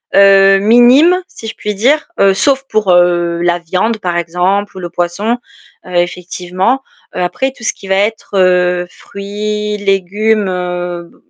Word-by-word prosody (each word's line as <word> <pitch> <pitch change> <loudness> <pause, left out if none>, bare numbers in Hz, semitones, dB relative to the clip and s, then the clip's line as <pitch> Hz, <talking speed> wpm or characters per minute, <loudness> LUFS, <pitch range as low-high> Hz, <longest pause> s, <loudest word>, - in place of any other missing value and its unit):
heu, 195 0 +6
minimes, 245 - +5
si 225 - -11
je - - -6
puis 210 0 -4
dire, 275 +10 +1
heu, 195 -1 +4
sauf 270 +7 +1
pour, 210 -4 +1
heu, 175 -1 +2
la 175 0 +1
viande 185 +7 -1
par 175 -3 -2
exemple 180 +4 -1
ou - - -6
le 175 - -6
poisson, 175 +7 -2 0.5
heu, 180 -1 -8
effectivement. 180 +6 -1 0.3
Heu, - - -3
après 265 +9 -1
tout 235 - -15
ce - - -1
qui 195 - -13
va 190 - +2
être, 210 +3 -1
heu, 180 -1 +2
fruits, 210 +2 -5
légumes, 205 +2 0
heu, 180 -1 -4
b - - -24
195 Hz, 165 wpm, -13 LUFS, 180-215 Hz, 0.5 s, heu